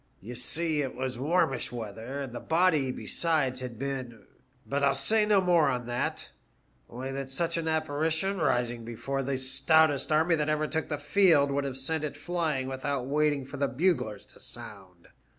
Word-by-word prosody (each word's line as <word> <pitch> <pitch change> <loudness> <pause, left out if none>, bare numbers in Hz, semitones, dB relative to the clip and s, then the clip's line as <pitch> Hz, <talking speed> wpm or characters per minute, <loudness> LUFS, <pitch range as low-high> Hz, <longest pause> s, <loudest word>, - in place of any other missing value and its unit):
You 115 +5 -8
see 155 +5 0
it 135 -2 -4
was 130 -1 -3
warmish 140 -3 +1
weather, 115 +4 -6
and 130 -3 -6
the 120 - -4
body 160 -5 +2
besides 140 -3 -1
had 125 -3 -6
been 130 -3 -5 0.2
— 130 +1 -38
but 140 +1 -1
I'll 140 -1 +4
say 210 +11 +2
no 210 -2 +5
more 175 -5 +4
on 125 -2 -2
that; 120 0 -3 0.6
only 130 +3 -5
that 135 0 -4
such 165 +5 -1
an 165 -1 -2
apparition 160 +4 0
rising 120 -6 0
before 120 +4 -3
the 135 0 -1
stoutest 140 +3 +3
army 160 +3 +4
that 150 0 0
ever 155 0 +1
took 160 +1 -2
the 150 - -1
field 145 -2 +4
would 140 0 0
have 135 -1 -4
sent 155 +4 -2
it 145 -1 -4
flying 155 -4 -1
without 135 0 -2
waiting 145 0 +1
for 140 +1 -8
the 140 +1 +1
buglers 135 - 0
to - - -17
sound. 95 -4 -9
140 Hz, 185 wpm, -29 LUFS, 130-160 Hz, 0.6 s, no